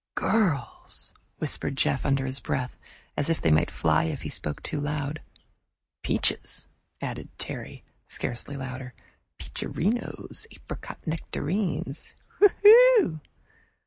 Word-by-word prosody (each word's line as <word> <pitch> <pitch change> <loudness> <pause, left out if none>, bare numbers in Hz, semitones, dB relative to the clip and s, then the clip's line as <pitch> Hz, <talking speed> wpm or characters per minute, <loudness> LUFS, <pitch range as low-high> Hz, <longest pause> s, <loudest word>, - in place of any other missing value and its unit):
"Girls!" 180 - 0 0.2
whispered - - 0
Jeff, 75 - +1
under 135 -1 +2
his 130 +1 -1
breath, 125 -1 -2 0.4
as 145 - 0
if 165 - +1
they 80 - +2
might 75 - +4
fly 80 0 +2
if 80 - -3
he - - -4
spoke 75 - -4
aloud. 145 +1 -2 0.8
"Peaches!" - - 0 0.4
added - - -5
Terry, - - -6 0.2
scarcely 120 +4 -2
louder. 130 -1 -6 0.4
"Peacherinos 235 - -2
apricot - - -9
nectarines! 160 -1 -2 0.2
Whew!" 420 - +7
145 Hz, 105 wpm, -27 LUFS, 130-190 Hz, 0.8 s, Whew